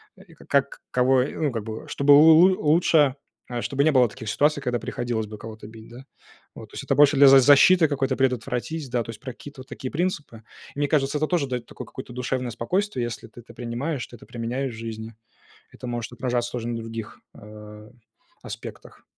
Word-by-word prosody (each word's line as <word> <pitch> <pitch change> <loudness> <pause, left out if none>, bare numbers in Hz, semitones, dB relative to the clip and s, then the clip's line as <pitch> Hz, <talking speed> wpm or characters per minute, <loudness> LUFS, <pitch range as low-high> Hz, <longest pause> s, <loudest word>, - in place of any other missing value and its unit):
и - - -18
как - - -1
кого, 130 0 +3
ну, 145 +1 -2
как 115 -3 -4
бы, 110 -1 -7
чтобы 140 +1 +4
лу 155 +3 +8
лу 185 +3 +5
лучше, 155 -5 +3 0.5
чтобы 140 +3 0
не 155 - +4
было 125 -3 +4
таких 110 +1 -8
ситуаций, 145 +3 +1
когда 120 -2 -1
приходилось 115 -3 -3
бы 105 - -9
кого-то 110 0 -10
бить, 110 0 -13
да. 125 +3 -12 0.5
Вот, - - -11
то - - -24
есть, - - -6
это - - +1
больше 145 -1 +5
для 140 0 +8
за 135 0 +9
защиты 145 +5 +6
какой-то 135 -2 -1
предотвратить, 135 +3 -2
да, 120 -1 -1
то - - -14
есть, 110 - -12
про 130 - -7
какие-то 145 +2 -13
вот 130 - -14
такие 130 - -7
принципы. 150 -9 -3 0.3
Мне 145 0 0
кажется, 140 -1 +1
это 155 +1 0
тоже 165 -6 0
дает 125 -2 -4
такое 125 - -10
какое-то 125 +1 -10
душевное 125 0 -3
спокойствие. 155 - -2
Если 120 -1 -6
ты 120 - -14
это 115 - -16
принимаешь, 125 +4 -4
ты - - -13
это 115 - -15
применяешь 125 +2 -4
в 110 - -10
жизни. 110 0 -7 0.6
Это 125 - -10
может 120 -1 -4
отражаться 120 -1 -2
тоже 120 -1 -4
на 120 - -3
других, 115 -1 -7 0.2
э, 105 0 -12 0.5
аспектах. - - -10
125 Hz, 205 wpm, -24 LUFS, 115-145 Hz, 0.6 s, за